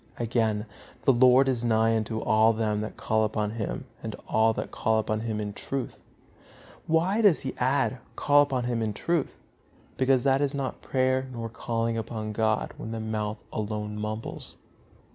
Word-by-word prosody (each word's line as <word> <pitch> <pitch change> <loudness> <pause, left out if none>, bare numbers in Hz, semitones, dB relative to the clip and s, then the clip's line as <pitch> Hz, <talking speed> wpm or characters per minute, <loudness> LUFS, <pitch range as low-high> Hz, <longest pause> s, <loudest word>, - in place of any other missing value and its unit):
Again, 110 -2 0 0.4
"The 135 - +5
Lord 130 +2 +6
is 125 -3 +1
nigh 115 -1 +3
unto 110 0 -2
all 110 +1 +4
them 110 -1 0
that 110 - -6
call 110 0 +1
upon 105 -1 -1
Him, 110 -2 -4 0.2
to - - -5
all 110 +1 +3
that - - -4
call 110 0 +1
upon 110 0 0
Him 110 -1 -3
in 105 -1 -3
truth." 135 +3 -4 0.9
Why 175 +7 +2
does 200 -7 +5
he 135 - -3
add, 130 0 +1 0.2
"call 145 0 +5
upon 135 -3 0
Him 120 -1 -1
in 110 -2 -1
truth"? 165 +7 -1 0.6
Because 130 -1 +3
that 135 0 +3
is 140 -1 0
not 135 -2 -3
prayer 130 0 +1
nor 115 -2 -5
calling 115 0 -2
upon 110 -1 -4
God 110 0 0
when - - -6
the 115 0 -4
mouth 110 -1 -2 0.2
alone 105 0 -3
mumbles. 110 +1 -5
115 Hz, 170 wpm, -27 LUFS, 110-130 Hz, 0.9 s, Lord